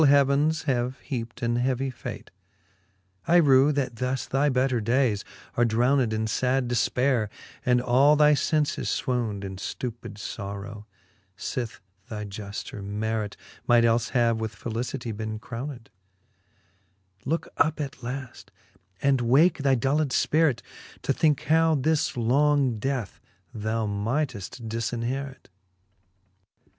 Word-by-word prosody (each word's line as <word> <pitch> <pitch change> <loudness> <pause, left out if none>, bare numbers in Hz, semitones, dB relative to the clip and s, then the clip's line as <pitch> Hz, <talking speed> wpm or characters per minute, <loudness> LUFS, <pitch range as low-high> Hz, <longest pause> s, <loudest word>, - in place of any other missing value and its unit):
heavens 140 +2 +4
have 130 -3 0
heapt 120 -1 -4
an 120 0 +1
heavy 130 +2 0
fate: 120 - -8 1.0
I 170 - +4
rew, 140 -4 +6
that 130 -4 -2
thus 125 +2 -1
thy 140 +2 +1
better 130 -2 +1
dayes 115 -2 +1 0.3
are 120 - +3
drowned 120 +2 +2
In 110 0 -1 0.2
lad 130 0 +2
defpaire, 120 0 +1 0.4
and 125 -1 +3
all 130 +4 +4
thy 150 0 +6
fenies 150 0 0
fwowned 115 -6 -2
In 95 -1 -6
ftupid 120 +3 -5
forow, 100 0 -6 0.5
fith 120 -1 -4 0.3
thy 105 -1 -5
jufter 100 0 -7
merit 105 +1 -2 0.3
Might 120 -1 +5
elie 115 0 +2
have 115 -2 +3
with 110 -1 -4
felicitie 115 -1 -4
bene 110 0 -4
crowned: 120 +2 -7 1.3
Looke 160 +5 -2
up 155 -1 +2
at 140 -2 -5
laft, 125 +1 -6 0.5
and 135 -2 +3
wake 140 +10 +4
thy 140 -1 +3
dulled 140 +4 +1
fpirit, 145 -2 +2 0.4
To 135 - +1
thinke 150 -1 +2
how 160 +1 +4
this 150 0 +1
long 135 0 +2
death 125 -3 -3 0.3
thou 110 +1 -1
mighteft 115 +1 -2
difinherit. 120 +4 -3
125 Hz, 125 wpm, -26 LUFS, 115-140 Hz, 1.3 s, rew